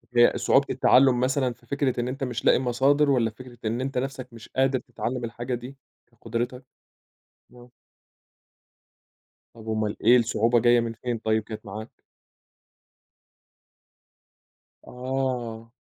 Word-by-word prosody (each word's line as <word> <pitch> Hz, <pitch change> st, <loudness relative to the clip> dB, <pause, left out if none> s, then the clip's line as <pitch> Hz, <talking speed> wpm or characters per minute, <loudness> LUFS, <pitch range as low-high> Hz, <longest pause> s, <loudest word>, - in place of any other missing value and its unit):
هي 120 Hz, 0 st, +6 dB
صعوبة 140 Hz, -, +3 dB
التعلُّم 130 Hz, 0 st, +4 dB
مثلًا 130 Hz, 0 st, +1 dB
في -, -, -25 dB
فكرة 140 Hz, -3 st, -1 dB
إن 120 Hz, -, -1 dB
أنت 135 Hz, +2 st, -4 dB
مش 125 Hz, -2 st, -4 dB
لاقي -, -, +5 dB
مصادر؟ 135 Hz, +4 st, +2 dB
والّا 120 Hz, -4 st, +2 dB
فكرة 125 Hz, +2 st, -13 dB
إن 115 Hz, +3 st, -1 dB
أنت 135 Hz, 0 st, -3 dB
نَفْسك 130 Hz, -1 st, -4 dB
مش 115 Hz, -2 st, -12 dB
قادر 130 Hz, 0 st, +1 dB
تتعلّم 125 Hz, +1 st, -5 dB
الحاجة 120 Hz, +2 st, -4 dB
دي؟ 125 Hz, +3 st, -9 dB, 0.3 s
كقدرِتك؟ 120 Hz, +2 st, -5 dB, 0.9 s
آه. 125 Hz, 0 st, -16 dB, 1.9 s
طَب 110 Hz, -1 st, -13 dB
أومّال 110 Hz, -1 st, -1 dB
إيه 120 Hz, +2 st, +8 dB
الصعوبة، 120 Hz, 0 st, +2 dB
جاية 120 Hz, +1 st, +4 dB
من 115 Hz, -1 st, -2 dB
فين 120 Hz, +1 st, -4 dB
طيب 110 Hz, 0 st, 0 dB
كانت 110 Hz, +1 st, -9 dB
معاك؟ 105 Hz, +3 st, -9 dB, 2.9 s
آه. 125 Hz, -3 st, -4 dB
120 Hz, 130 wpm, -25 LUFS, 115-130 Hz, 2.9 s, إيه